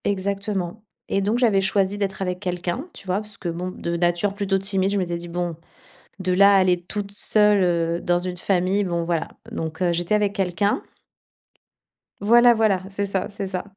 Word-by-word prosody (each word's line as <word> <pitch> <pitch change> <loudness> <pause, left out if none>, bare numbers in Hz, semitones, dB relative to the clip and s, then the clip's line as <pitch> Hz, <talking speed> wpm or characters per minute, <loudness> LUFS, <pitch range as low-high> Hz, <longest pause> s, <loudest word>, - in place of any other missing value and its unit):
Exactement 200 0 -2 0.3
et 195 - +3
donc 210 +5 +1
j'avais 220 -6 +4
choisi 195 +1 +1
d'être 195 -1 -3
avec 180 -1 -2
quelqu'un, 180 - -3
tu - - -12
vois, 185 0 0
parce 210 -1 -6
que 175 - -4
bon, 175 +2 -4
de 170 -1 -3
nature 175 +3 +1
plutôt 200 -1 0
timide, 195 0 0
je 205 - 0
m'étais 175 -3 -1
dit: 170 0 -8
«Bon, 175 -1 -3 0.6
de 185 -1 0
là, 200 +2 +6
à - - +7
aller 185 -1 +3
toute 200 +2 -5
seule, 210 -1 +3
heu, 170 -1 +1
dans 175 0 +2
une 180 0 -4
famille, 190 +2 +1
bon 170 -3 -1
voilà». 165 -1 -1 0.2
Donc 160 +1 -5
heu, 175 -1 +2
j'étais 175 +4 -1
avec 205 -1 +2
quelqu'un 195 +1 0 1.4
voilà, 240 +4 +6
voilà, 215 -5 +2
c'est 200 +1 -2
ça, 195 -1 -2
c'est 200 -1 -5
ça 185 -1 -3
190 Hz, 190 wpm, -23 LUFS, 175-200 Hz, 1.4 s, à